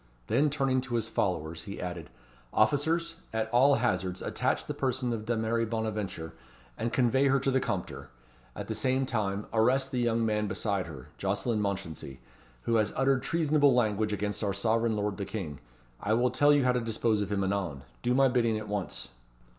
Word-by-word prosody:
Then 150 Hz, -, +2 dB
turning 135 Hz, -3 st, +1 dB
to 125 Hz, -2 st, -4 dB
his 115 Hz, -2 st, 0 dB
followers, 85 Hz, -5 st, -2 dB
he 100 Hz, -1 st, -7 dB
added 85 Hz, -3 st, -5 dB, 0.4 s
"Officers, 160 Hz, +8 st, +1 dB
at 110 Hz, 0 st, -1 dB
all 135 Hz, +4 st, +5 dB
hazards, 95 Hz, -7 st, -1 dB
attach -, -, -1 dB
the -, -, -3 dB
person 130 Hz, -2 st, -1 dB
of 110 Hz, -2 st, -4 dB
Dameris 115 Hz, 0 st, 0 dB
Bonaventure, 105 Hz, -7 st, -3 dB, 0.4 s
and 115 Hz, -, -2 dB
convey 130 Hz, +2 st, +3 dB
her 135 Hz, 0 st, +3 dB
to 135 Hz, +1 st, 0 dB
the 130 Hz, -, +3 dB
Compter. 75 Hz, -, -4 dB, 0.5 s
At -, -, -6 dB
the 110 Hz, -, -2 dB
same 130 Hz, +4 st, +1 dB
time, 105 Hz, -5 st, -1 dB
arrest 130 Hz, +5 st, +3 dB
the 125 Hz, -, -1 dB
young 115 Hz, -1 st, +1 dB
man 105 Hz, -1 st, 0 dB
beside 100 Hz, -1 st, -1 dB
her 70 Hz, -6 st, -10 dB
Jocelyn 115 Hz, -3 st, 0 dB
Mounchensey, 95 Hz, -9 st, -4 dB, 0.4 s
who 115 Hz, -, +2 dB
has 105 Hz, -1 st, +2 dB
uttered 135 Hz, 0 st, +2 dB
treasonable 150 Hz, -5 st, +3 dB
language 110 Hz, -3 st, +1 dB
against 105 Hz, +1 st, -2 dB
our 100 Hz, -2 st, 0 dB
sovereign 115 Hz, +2 st, +1 dB
lord 105 Hz, -1 st, -1 dB
the 100 Hz, -, -3 dB
King. 85 Hz, -11 st, -5 dB, 0.4 s
I 105 Hz, -, +1 dB
will 125 Hz, +1 st, +2 dB
tell 145 Hz, +3 st, +4 dB
you 145 Hz, -2 st, +4 dB
how 125 Hz, -, +4 dB
to 125 Hz, 0 st, 0 dB
dispose 115 Hz, -1 st, 0 dB
of 105 Hz, -, -3 dB
him 100 Hz, -1 st, +1 dB
anon. 95 Hz, -8 st, -2 dB, 0.2 s
Do 125 Hz, +1 st, +1 dB
my 135 Hz, 0 st, +5 dB
bidding 115 Hz, -3 st, +2 dB
at 110 Hz, 0 st, -6 dB
once." 100 Hz, -11 st, -4 dB
110 Hz, 185 wpm, -29 LUFS, 100-130 Hz, 0.5 s, all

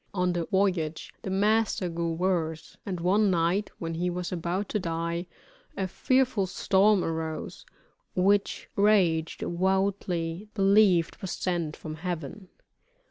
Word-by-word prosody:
On 180 Hz, -1 st, +1 dB
the 170 Hz, -1 st, -1 dB
voyage 180 Hz, -5 st, 0 dB
the -, -, -5 dB
master 205 Hz, 0 st, +2 dB
grew 170 Hz, -1 st, -2 dB
worse, 165 Hz, -2 st, -1 dB
and 185 Hz, -3 st, -3 dB
one 195 Hz, +4 st, +3 dB
night 180 Hz, +3 st, +1 dB
when 165 Hz, -1 st, -4 dB
he 175 Hz, +2 st, -1 dB
was 180 Hz, 0 st, -4 dB
about 180 Hz, +3 st, -2 dB
to 210 Hz, -, 0 dB
die, 170 Hz, 0 st, -3 dB, 0.5 s
a 190 Hz, -, -1 dB
fearful 255 Hz, -1 st, +1 dB
storm 195 Hz, +1 st, +3 dB
arose, 160 Hz, -1 st, -4 dB, 0.5 s
which 195 Hz, +2 st, +2 dB
Rache 185 Hz, -6 st, +3 dB
devoutly 185 Hz, -1 st, -1 dB
believed 195 Hz, -4 st, +4 dB
was 190 Hz, -, -3 dB
sent 170 Hz, -4 st, -2 dB
from 155 Hz, -1 st, -7 dB
Heaven. 175 Hz, +2 st, -5 dB
180 Hz, 130 wpm, -27 LUFS, 165-195 Hz, 0.5 s, believed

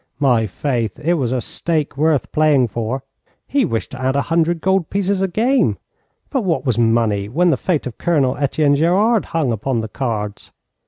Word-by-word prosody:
My 120 Hz, -6 st, +2 dB
faith, 115 Hz, 0 st, -2 dB
it 160 Hz, +4 st, 0 dB
was 130 Hz, -8 st, -1 dB
a 130 Hz, -, 0 dB
stake 155 Hz, +3 st, -2 dB
worth 150 Hz, 0 st, +1 dB
playing 150 Hz, -6 st, +3 dB
for. 120 Hz, +5 st, -3 dB, 0.4 s
He 280 Hz, -2 st, +2 dB
wished 115 Hz, -, -3 dB
to 130 Hz, -, -8 dB
add 130 Hz, +1 st, 0 dB
a 140 Hz, -, +1 dB
hundred 170 Hz, 0 st, +2 dB
gold 190 Hz, -1 st, +1 dB
pieces 195 Hz, -1 st, 0 dB
a 195 Hz, -, +2 dB
game, 235 Hz, +9 st, +1 dB, 0.5 s
but 265 Hz, -, 0 dB
what 170 Hz, -6 st, -1 dB
was 120 Hz, -4 st, 0 dB
money 115 Hz, -3 st, +1 dB
when 170 Hz, +8 st, +2 dB
the -, -, +3 dB
fate 170 Hz, -6 st, -1 dB
of 125 Hz, -, -7 dB
Colonel 145 Hz, -7 st, +1 dB
Etienne 145 Hz, +1 st, +2 dB
Gerard 195 Hz, +9 st, +2 dB
hung 155 Hz, -7 st, -1 dB
upon 115 Hz, +2 st, -1 dB
the 110 Hz, -, -4 dB
cards? 105 Hz, -4 st, -4 dB
140 Hz, 190 wpm, -19 LUFS, 120-170 Hz, 0.5 s, playing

